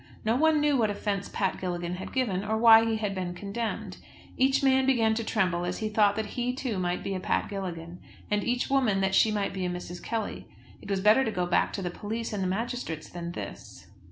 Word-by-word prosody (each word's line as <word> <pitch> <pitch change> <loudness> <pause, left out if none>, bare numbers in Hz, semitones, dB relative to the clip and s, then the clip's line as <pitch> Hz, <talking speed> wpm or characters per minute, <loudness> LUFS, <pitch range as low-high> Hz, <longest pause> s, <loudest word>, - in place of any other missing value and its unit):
No 225 +2 +2
one 315 +3 +4
knew 295 -2 +3
what 220 -3 +2
offence 200 -1 -2
Pat 190 -3 -1
Gilligan 175 -1 -3
had 190 - -7
given, 205 -8 0
or 220 +1 -1
why 225 0 +8
he 225 -1 0
had 210 -2 -2
been 180 -2 -4
condemned. 205 +4 -4 0.4
Each 270 +1 +2
man 265 -1 +4
began 225 -4 +3
to 230 +1 -2
tremble 180 -6 0
as 180 +1 -2
he 215 - -2
thought 210 -1 +3
that 215 -1 -4
he 250 +1 0
too 250 -7 -3
might 180 0 -1
be 195 - -3
a 185 - -2
Pat - - -1
Gilligan, 175 -3 -5 0.3
and 210 -1 +1
each 245 0 0
woman 250 -8 +2
that 190 0 +1
she 220 - +5
might 205 -2 -1
be 190 -1 -3
a 180 - 0
Mrs. 175 0 -6
Kelly. 225 -3 -4 0.3
It - - -11
was 195 -1 0
better 215 +6 +5
to 230 - -1
go 180 -4 -1
back 175 - +2
to 195 - -3
the 175 - -2
police 220 +5 -4
and 205 - -2
the 185 - 0
magistrates 205 - -3
than 170 -1 -6
this! - - -8
205 Hz, 235 wpm, -28 LUFS, 185-230 Hz, 0.4 s, why